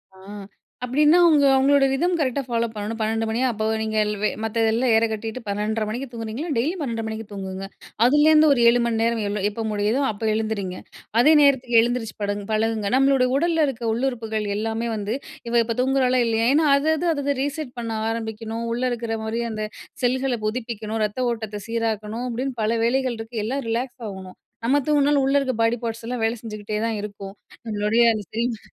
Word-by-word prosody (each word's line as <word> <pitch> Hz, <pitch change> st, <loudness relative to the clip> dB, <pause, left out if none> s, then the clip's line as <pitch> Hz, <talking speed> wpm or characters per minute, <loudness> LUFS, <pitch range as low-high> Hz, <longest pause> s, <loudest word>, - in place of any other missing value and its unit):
ஆ -, -, -18 dB, 0.7 s
அப்படின்னா, 300 Hz, +6 st, +4 dB
அவங்க 300 Hz, -4 st, +5 dB
அவங்களோட 275 Hz, +1 st, +4 dB
ரிதம் 345 Hz, +7 st, +1 dB
கரெக்ட்டா 280 Hz, -2 st, 0 dB
ஃபாலோ 235 Hz, -1 st, 0 dB
பண்ணணும். 210 Hz, +2 st, -4 dB
12 225 Hz, +1 st, 0 dB
மணியா 240 Hz, +4 st, 0 dB
அப்போ 215 Hz, 0 st, -3 dB, 0.2 s
நீங்க 220 Hz, 0 st, -2 dB
எல் 210 Hz, -, -1 dB
வ -, -, +1 dB, 0.2 s
மத்ததுதெல்லாம் 225 Hz, +2 st, +1 dB
ஏற 225 Hz, -, +4 dB
கட்டிட்டு 220 Hz, +3 st, -4 dB
12:30 210 Hz, +2 st, -1 dB
மணிக்கு 255 Hz, +5 st, -4 dB
தூங்குனீங்களா 230 Hz, +7 st, -5 dB
டெய்லி 300 Hz, +10 st, 0 dB
12.30 230 Hz, -5 st, -3 dB
மணிக்கு 220 Hz, 0 st, -5 dB
தூங்குங்க. 190 Hz, -1 st, -6 dB, 0.4 s
அதுலேருந்து 305 Hz, +3 st, +5 dB
ஒரு 245 Hz, -, -1 dB
7 240 Hz, +1 st, +3 dB
மணிநேரம் 230 Hz, 0 st, 0 dB, 0.3 s
எப்போ 225 Hz, +2 st, -5 dB
முடியுதோ 210 Hz, +6 st, 0 dB
அப்போ 215 Hz, +1 st, -6 dB
எழுந்துரிங்க. 205 Hz, -4 st, -3 dB, 0.4 s
அதே 295 Hz, +6 st, +6 dB
நேரத்துக்கு 255 Hz, -5 st, +4 dB
எழுந்திரிச்சு 235 Hz, -2 st, -2 dB
படகுங் 205 Hz, 0 st, -2 dB
பழகுங்க. 215 Hz, -1 st, 0 dB
நம்மளுட 270 Hz, -1 st, +4 dB
உடல்ல 325 Hz, -1 st, +2 dB
இருக்கிற 235 Hz, -3 st, -4 dB
உள்ளுறுப்புகள் 225 Hz, -4 st, -2 dB
எல்லாமே 225 Hz, +2 st, -2 dB
வந்து 210 Hz, +3 st, -2 dB, 0.3 s
இவள் 235 Hz, 0 st, +4 dB
இப்போ 230 Hz, -, -2 dB
தூங்குறாளா? 255 Hz, -1 st, +2 dB
இல்லையா? 225 Hz, 0 st, +1 dB
ஏன்னா 310 Hz, 0 st, +3 dB
அது, 290 Hz, +3 st, 0 dB
அது 345 Hz, +3 st, -1 dB
அதை 285 Hz, -1 st, -1 dB
ரீசெட் 285 Hz, -2 st, -4 dB
பண்ண 230 Hz, -1 st, -3 dB, 0.2 s
ஆரம்பிக்கணும், 225 Hz, 0 st, -4 dB
உள்ள 245 Hz, -, -2 dB
இருக்குற 230 Hz, -1 st, -3 dB
மாரி 225 Hz, +2 st, -2 dB
அந்த 215 Hz, 0 st, -4 dB, 0.4 s
செல்களை 255 Hz, 0 st, +1 dB
புதுப்பிக்கணும், 225 Hz, -1 st, -4 dB
ரத்த 245 Hz, +5 st, -2 dB
ஓட்டத்தை 215 Hz, -2 st, -5 dB
சீராக்கணும், 225 Hz, 0 st, -2 dB
அப்படின்னு 255 Hz, +2 st, -3 dB
பல 215 Hz, -, +1 dB
வேலைகள் 255 Hz, -1 st, 0 dB
இருக்கு. 225 Hz, +1 st, -8 dB
எல்லாம் 270 Hz, +4 st, -2 dB
ரிலாக்ஸ் 245 Hz, +2 st, -3 dB
ஆகணும். 190 Hz, -1 st, -9 dB, 0.3 s
நம்ம 270 Hz, +4 st, +3 dB
தூங்குனாலும், 290 Hz, -2 st, +3 dB
உள்ளே 275 Hz, +1 st, +3 dB
இருக்கிற 260 Hz, -3 st, 0 dB
பாடி 230 Hz, +1 st, +3 dB
பார்ட்ஸ்லாம் 230 Hz, +1 st, -4 dB
வேலை 225 Hz, +2 st, +1 dB
செஞ்சுகிட்டே 215 Hz, -1 st, -5 dB
தான் 225 Hz, -1 st, -1 dB
இருக்கும். 200 Hz, -2 st, -8 dB, 0.3 s
நம்மளுடைய 215 Hz, +2 st, +2 dB
அந்த 215 Hz, -1 st, -4 dB
சினிமா 230 Hz, -1 st, -2 dB
230 Hz, 175 wpm, -23 LUFS, 220-260 Hz, 0.7 s, அதே